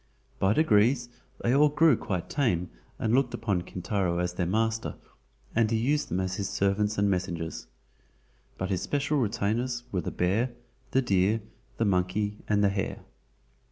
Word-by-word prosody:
By 95 +1 +3
degrees 120 -2 +3 0.3
they 120 - +2
all 150 +2 +5
grew 155 -1 +5
quite 90 -5 -3
tame 90 - 0 0.3
and 110 - 0
looked 125 -2 +2
upon 105 -6 0
Kintaro 90 0 -2
as 90 0 -1
their 90 -1 -1
master, 110 +3 0 0.6
and 115 -1 +3
he 115 - +1
used 145 +6 +1
them 90 - -1
as 95 0 -2
his 100 -2 -2
servants 105 +2 +1
and 100 0 +3
messengers. 90 -4 -2 0.9
But 95 +1 -3
his 95 - 0
special 145 +1 0
retainers 120 +2 -1
were 90 - 0
the - - -3
bear, 110 +8 0 0.4
the 135 +1 +2
deer, 100 +1 +2 0.4
the 115 - +1
monkey 105 +2 0
and 105 -1 +2
the 100 - +5
hare. 100 -1 -3
105 Hz, 160 wpm, -28 LUFS, 95-120 Hz, 0.9 s, all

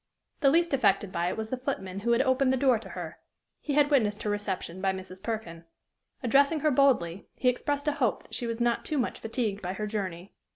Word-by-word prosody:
The 275 - +5
least 335 +2 +3
affected 200 -6 +2
by 170 0 0
it - - -4
was 220 0 -4
the 255 - -1
footman 195 -8 -4
who 235 +4 0
had 245 +3 +3
opened 260 0 +3
the 265 - +2
door 255 -3 +3
to 200 -3 -10
her: 170 -4 -7 0.4
he 290 - -3
had 290 0 +3
witnessed 215 -7 +2
her 210 - 0
reception 190 -3 -3
by 190 0 +1
Mrs. 185 0 -8
Perkin. 210 -8 -5 0.6
Addressing 280 +5 +3
her 305 - +3
boldly, 240 -10 +2
he 250 - +2
expressed 285 +4 -2
a - - +4
hope 265 -7 0
that - - -19
she 240 - -2
was 230 0 -3
not 240 0 +1
too 305 - -2
much 245 - -1
fatigued 220 -3 -2
by 180 0 -3
her 210 +2 -3
journey. 195 -4 -4
225 Hz, 225 wpm, -28 LUFS, 190-270 Hz, 0.6 s, The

